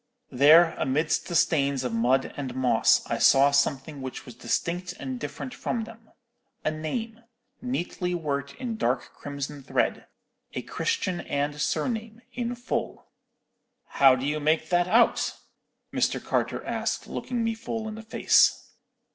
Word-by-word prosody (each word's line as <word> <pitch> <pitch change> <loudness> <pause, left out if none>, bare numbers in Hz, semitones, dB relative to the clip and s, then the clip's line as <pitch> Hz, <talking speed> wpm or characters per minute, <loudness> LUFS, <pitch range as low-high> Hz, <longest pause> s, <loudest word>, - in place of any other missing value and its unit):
"There, 155 +6 +6
amidst 150 +4 0
the 175 - -4
stains 140 -5 +2
of 125 -2 -2
mud 125 +4 +1
and 130 -3 -5
moss, 125 -3 +3
I - - -2
saw 140 +1 +6
something 140 0 0
which 130 -1 -6
was 125 - -10
distinct 175 +8 -2
and 130 -6 -6
different 145 - -6
from 235 -1 -2
them. 225 0 -13 0.6
A 155 - +2
name, 220 +9 -4 0.4
neatly 180 -7 -2
worked 140 -4 -3
in 235 -4 -4
dark 125 - -1
crimson 140 0 -6
thread—a 135 - -4
Christian 195 - -2
and 145 +1 -2
surname, 225 +3 -2
in 245 0 -3
full. 245 +1 -4 0.8
"'How 135 -2 +6
do 130 +1 -4
you 150 +2 0
make 155 +1 +1
that 175 0 +2
out?' 230 +5 +3 0.6
Mr. - - +1
Carter - - -2
asked, - - -2
looking 245 -2 -3
me 225 0 0
full 225 0 -5
in 215 - -5
the 220 - -8
face. 220 - +3
155 Hz, 145 wpm, -26 LUFS, 140-220 Hz, 0.8 s, There